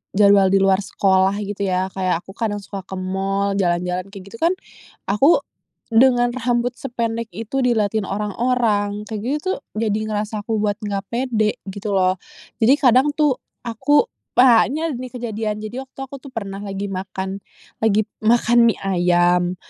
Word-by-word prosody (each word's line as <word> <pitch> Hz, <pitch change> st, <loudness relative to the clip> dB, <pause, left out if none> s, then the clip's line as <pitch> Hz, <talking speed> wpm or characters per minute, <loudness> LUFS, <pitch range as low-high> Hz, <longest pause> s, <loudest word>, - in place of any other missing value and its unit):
jadwal 200 Hz, -1 st, +6 dB
di 195 Hz, -, +2 dB
luar 195 Hz, -1 st, +4 dB
sekolah 190 Hz, -1 st, +2 dB
gitu 200 Hz, 0 st, -3 dB
yah. 185 Hz, +1 st, 0 dB
Kayak 185 Hz, -3 st, -1 dB
aku 190 Hz, -, -12 dB
kadang 205 Hz, 0 st, -2 dB
suka 195 Hz, 0 st, -6 dB
ke 190 Hz, -, -6 dB
mall, 195 Hz, +2 st, -1 dB
jalan-jalan 180 Hz, 0 st, 0 dB
kek 195 Hz, -1 st, -11 dB
gitu 200 Hz, +4 st, -12 dB
kan 335 Hz, +2 st, +3 dB, 0.6 s
aku, 270 Hz, -, +4 dB, 0.5 s
dengan 245 Hz, +1 st, +4 dB
rambut 240 Hz, 0 st, 0 dB
sependek 230 Hz, -3 st, -3 dB
itu 225 Hz, +7 st, -3 dB
dilatin 220 Hz, -3 st, +1 dB
orang-orang 210 Hz, 0 st, -1 dB
kek 215 Hz, -2 st, -5 dB
gitu 270 Hz, +6 st, -1 dB, 0.2 s
tuh -, -, -7 dB, 0.2 s
jadi 215 Hz, -1 st, 0 dB
ngerasa 210 Hz, 0 st, -3 dB
aku 220 Hz, 0 st, -2 dB
buat 205 Hz, -1 st, +1 dB
nggak 200 Hz, -1 st, -3 dB
pede, 235 Hz, -3 st, 0 dB, 0.2 s
gitu 200 Hz, +1 st, -4 dB
loh. 185 Hz, -1 st, +2 dB, 0.4 s
Jadi 235 Hz, +5 st, +5 dB
kadang 270 Hz, +1 st, +3 dB
tuh 295 Hz, -4 st, +2 dB, 0.2 s
aku, 290 Hz, -, +2 dB, 0.2 s
banyak 260 Hz, +4 st, +4 dB
nih 255 Hz, 0 st, -6 dB
kejadian 220 Hz, -3 st, -3 dB
jadi 250 Hz, +5 st, -6 dB
waktu 265 Hz, -, -36 dB
aku 270 Hz, +1 st, -8 dB
tuh 265 Hz, 0 st, -13 dB
pernah 200 Hz, -3 st, -5 dB
lagi 200 Hz, 0 st, -5 dB
makan, 190 Hz, +1 st, -4 dB, 0.4 s
lagi 215 Hz, -1 st, +3 dB, 0.2 s
makan 235 Hz, +1 st, +4 dB
mie 225 Hz, -, +1 dB
ayam, 175 Hz, -1 st, +2 dB
210 Hz, 160 wpm, -21 LUFS, 195-240 Hz, 0.6 s, jadwal